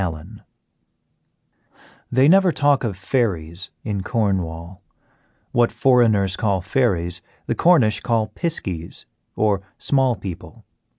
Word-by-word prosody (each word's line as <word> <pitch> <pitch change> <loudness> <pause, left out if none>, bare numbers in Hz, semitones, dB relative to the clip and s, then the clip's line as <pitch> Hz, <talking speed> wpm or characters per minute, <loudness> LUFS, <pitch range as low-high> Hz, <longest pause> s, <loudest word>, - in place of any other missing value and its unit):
ALLEN 90 +4 -6 1.7
They 130 +3 +4
never 190 +2 +5
talk 145 -1 +2
of 105 -6 -3
fairies 95 -6 -2
in 100 -2 -3
Cornwall; 95 -4 -2 0.7
what 120 -1 +2
"foreigners" 110 -7 +3
call 100 -3 0
fairies 90 -5 0 0.2
the - - -1
Cornish 140 - +3
call 115 -3 0
"piskies," 95 - -4 0.3
or 105 -2 +1 0.2
"small 135 -3 +1
people." 95 -4 -9
105 Hz, 105 wpm, -21 LUFS, 90-125 Hz, 1.7 s, never